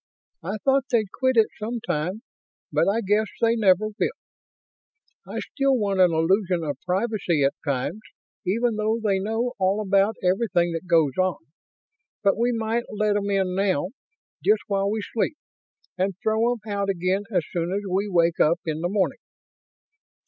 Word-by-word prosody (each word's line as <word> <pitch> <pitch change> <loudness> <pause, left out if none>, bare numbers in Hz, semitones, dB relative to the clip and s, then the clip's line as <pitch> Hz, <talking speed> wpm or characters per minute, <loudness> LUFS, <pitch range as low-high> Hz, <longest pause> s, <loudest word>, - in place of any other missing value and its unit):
I 195 +6 -3
thought 270 -1 +3
they'd 220 -6 +1
quit 260 -2 +1
it 220 - +5
sometime, 215 -3 -3 0.5
but - - +2
I 225 +3 +1
guess 210 +1 +1
they 230 0 +3
never 210 -1 +3
will. 225 - -2 1.1
I - - -6
still 275 -1 0
want 200 -4 0
an 180 -2 +6
illusion 175 +2 +1
of 145 -4 -4
privacy 190 -5 0
at 135 - +2
times, 140 +9 -2 0.4
even 220 +4 0
though 215 +2 0
they 205 -4 +1
know 225 +5 -1
all 190 +2 +2
about 200 +1 +2
everything 185 -2 +2
that 165 +2 -5
goes 165 -4 +4
on. 185 -1 +2 0.9
But 200 -1 +4
we 235 +3 +1
might 230 +1 -1
let 210 0 +1
'em 205 0 -1
in 190 -2 +1
now, 185 -3 +1 0.5
just 425 - +3
while 200 -1 0
we 215 0 -2
sleep, 235 +9 -2 0.6
and 190 0 0
throw 220 +2 +2
'em 245 - -1
out 200 -2 -2
again 190 +2 0
as 180 -7 0
soon 170 0 -2
as 200 +2 -1
we 195 +3 0
wake 170 -2 +2
up 170 +3 +4
in 160 -1 -2
the 175 - 0
morning?" 195 -1 0
200 Hz, 165 wpm, -24 LUFS, 180-220 Hz, 1.1 s, an